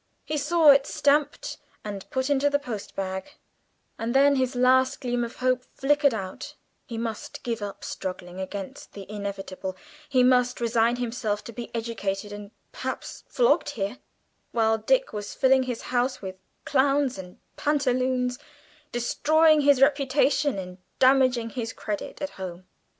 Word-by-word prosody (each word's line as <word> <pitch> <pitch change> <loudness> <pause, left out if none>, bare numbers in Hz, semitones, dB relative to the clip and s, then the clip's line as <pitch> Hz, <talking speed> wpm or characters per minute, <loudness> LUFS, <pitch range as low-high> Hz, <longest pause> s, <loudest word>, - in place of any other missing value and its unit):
He 305 - -2
saw 305 +1 +5
it 275 0 +4
stamped, 295 - +1 0.2
and 200 -2 -6
put 260 0 -1
into 285 0 +3
the 285 - +2
postbag, 200 -3 -5 0.6
and 230 +3 -2
then 280 +1 +6
his 260 -1 0
last 255 +1 +4
gleam 245 -1 -1
of 235 - -5
hope 255 0 +1
flickered 285 -2 +3
out; 190 -3 -6 0.3
he 230 - -5
must 225 -2 -5
give 230 -2 -3
up 200 -1 -6
struggling 180 -1 -6
against 190 +1 -6
the 200 -1 -8
Inevitable; 195 -2 -5 0.3
he 255 -2 +4
must 250 0 +3
resign 235 0 +2
himself 225 -4 -2
to 235 - -9
be 240 +1 -6
educated, 205 -3 -3
and 205 0 -8 0.2
perhaps - - -6
flogged - - +2
here, 200 +5 -3 0.5
while 225 -1 +2
Dick - - +1
was 205 -1 -5
filling 265 0 +4
his 240 - -4
house 250 +2 +1
with 190 -1 -6 0.3
clowns 275 -3 +2
and 180 -1 -10 0.2
pantaloons, 255 -3 0 0.5
destroying 310 +6 +3
his 280 -2 +5
reputation 280 -1 +2
and 180 -1 -7 0.2
damaging 255 -3 +4
his 230 -2 -4
credit 210 +6 -5
at 285 - -3
home. 180 0 -6
245 Hz, 145 wpm, -26 LUFS, 205-275 Hz, 0.6 s, then